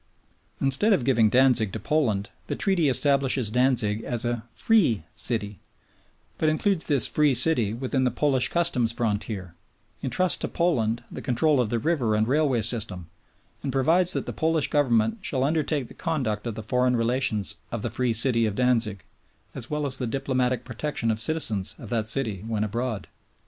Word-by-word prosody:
Instead 140 +11 +4
of 155 - +1
giving 115 -5 +3
Danzig 125 -4 +4
to 110 - -4
Poland, 110 -6 -1 0.2
the - - -3
Treaty 180 -7 +1
establishes 135 -4 +2
Danzig 120 -4 +2
as 120 -1 -2
a 120 -1 -2
"Free" 165 - +2
City, 105 -5 -3 0.8
but 155 - +2
includes 165 +3 +2
this 140 -4 +3
"Free" 150 -3 +2
City 120 -5 +4
within 130 +1 -1
the 125 - +2
Polish 130 +1 +1
Customs 165 -10 +1
frontier, 105 -5 -3 0.5
entrusts 185 +7 0
to - - -2
Poland 120 -10 0
the - - -7
control 135 +3 +2
of 115 - -2
the 120 - 0
river 120 -4 0
and 110 +1 +1
railway 135 -4 +1
system, 100 -7 -2 0.5
and 135 - -3
provides 165 +7 +2
that - - -2
"the - - -5
Polish 160 -1 0
Government 130 - +1
shall 130 -8 -2
undertake 150 -2 -1
the - - -13
conduct 125 - -3
of 115 - -4
the 110 - -6
foreign 125 +2 +1
relations 115 -3 0
of 115 -3 -4
the - - -3
Free 125 -2 0
City 115 0 +2
of 105 - -4
Danzig 115 -6 0 0.5
as 120 -1 -5
well 150 -1 -2
as 130 -2 -4
the 125 - -2
diplomatic 125 -1 -1
protection 120 -1 -2
of 110 - -3
citizens 110 -10 -2
of - - -10
that 115 -3 -1
city 110 -5 -2
when 110 -2 -1
abroad." 115 -1 -3
125 Hz, 175 wpm, -25 LUFS, 110-145 Hz, 0.8 s, Instead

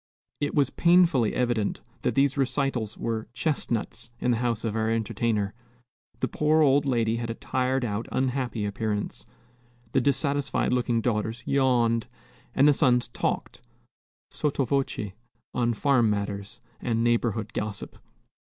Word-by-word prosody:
It 145 0 -1
was 140 -3 +3
painfully 170 -10 +4
evident 120 -4 0 0.2
that - - 0
these 140 0 +3
recitals 135 -5 -1
were 110 -1 -3
"chestnuts" 120 -6 -1
in 125 - +1
the 120 - +2
house 120 -1 -1
of 110 -1 -2
our 110 0 0
entertainer. 110 -2 0 0.7
The - - +2
poor 155 +1 +2
old 140 0 +4
lady 115 -3 +1
had 115 0 -4
a 115 - -3
tired 130 +1 -1
out, 105 +1 -3
unhappy 130 -4 -1
appearance, 105 0 -3 0.6
the 135 - +2
dissatisfied 140 0 +1
looking 120 -2 +1
daughters 115 +1 -1
yawned, 120 -4 +2 0.5
and 140 - +5
the 145 - +6
sons 125 -4 +3
talked, - - -3 0.7
sotto 145 -2 0
voce, 130 -6 -1 0.4
on 120 -1 +1
farm 130 -4 +3
matters 100 +2 -3 0.2
and 115 -2 0
neighborhood 115 -2 0
gossip. 105 -1 -5
120 Hz, 135 wpm, -26 LUFS, 110-135 Hz, 0.7 s, the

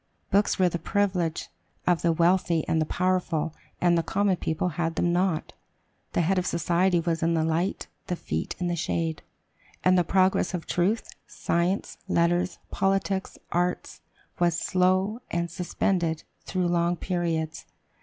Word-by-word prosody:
Books 200 +1 +3
were 185 - +4
the 170 -1 -2
privilege 180 -3 0 0.4
of 175 -2 +2
the 170 - +3
wealthy 170 -1 +2
and 160 - +2
the 155 - 0
powerful; 175 -4 0 0.3
and 175 -1 +4
the 170 - +3
common 195 +3 +1
people 160 +2 -1
had 165 0 -2
them 175 +1 +1
not. 180 -2 0 0.6
"The - - +2
head 185 +3 +2
of 180 - -2
society 175 +2 +2
was 165 -1 -1
in 165 0 +2
the 160 - +2
light, 165 +4 0 0.2
the 180 - -1
feet 80 - -3
in 180 - -2
the 175 0 0
shade," 165 -1 -2 0.6
and 185 0 +5
"the - - +3
progress 185 +1 +2
of 170 - -5
truth, 195 +6 0 0.2
science, 175 +4 -1
letters, 175 0 +1
politics, 195 0 0
arts, 175 +1 -1 0.4
was 170 -1 +2
slow, 185 +4 +2
and 170 0 -2
suspended 175 -2 -1 0.2
through 185 -2 0
long 175 0 +2
periods." 165 -4 -2
175 Hz, 155 wpm, -26 LUFS, 165-185 Hz, 0.6 s, and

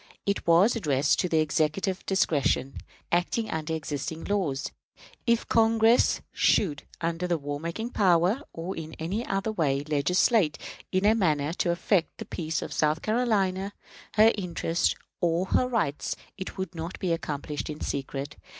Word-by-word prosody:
It 200 -2 -1
was 175 +8 +5
addressed 145 - +2
to 180 - +1
the 160 -1 +3
Executive 155 +5 0
discretion, 150 -7 +1 0.3
acting 180 +6 0
under 160 0 -2
existing 155 +1 -4
laws. 180 -10 -1 0.6
If 235 0 +2
Congress 225 +1 +4
should, 150 -7 +1
under 170 +2 -1
the 175 -1 +1
war 145 -1 -4
making 175 +9 -4
power, 185 +4 +3
or 170 +3 -5
in 160 -1 -7
any 185 +8 -3
other 195 +1 -1
way, 145 -8 0
legislate 155 - +2 0.3
in 185 +1 +1
a 215 - +6
manner 155 -8 +1
to 175 - -1
affect 170 +1 +1
the - - -6
peace 160 -2 -3
of - - -6
South 155 +1 +1
Carolina, 205 -4 +1 0.4
her 220 +2 +7
interests 175 -3 0 0.2
or 175 0 +1
her 250 - +2
rights, 190 - -1 0.2
it 190 - -7
would 190 -2 -4
not 165 +1 -5
be 180 -3 0
accomplished 150 -2 -4
in 150 0 -6
secret. 140 +1 -4
170 Hz, 150 wpm, -27 LUFS, 155-200 Hz, 0.6 s, her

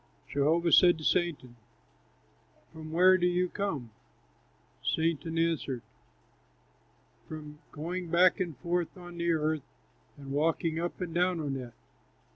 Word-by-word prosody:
Jehovah 160 +4 +2
said 175 0 +7
to 155 - -9
Satan, 150 -9 0 1.2
"From 155 -1 -9
where 185 +3 +5
do 175 - +3
you 180 +1 +1
come?" 155 - -3 0.9
Satan 165 0 0
answered, 160 -7 0 1.4
"From 150 -1 -9
going 175 +3 -5
back 180 +3 +4
and 170 -7 -3
forth 175 +5 -2
on 175 -1 -10
the 170 0 +1
earth, 155 -1 0 0.6
and 140 -1 -9
walking 160 +2 0
up 175 +2 -4
and 175 -2 -4
down 180 0 +1
on 145 -3 -2
it." 125 -3 -7
165 Hz, 125 wpm, -30 LUFS, 150-175 Hz, 1.4 s, said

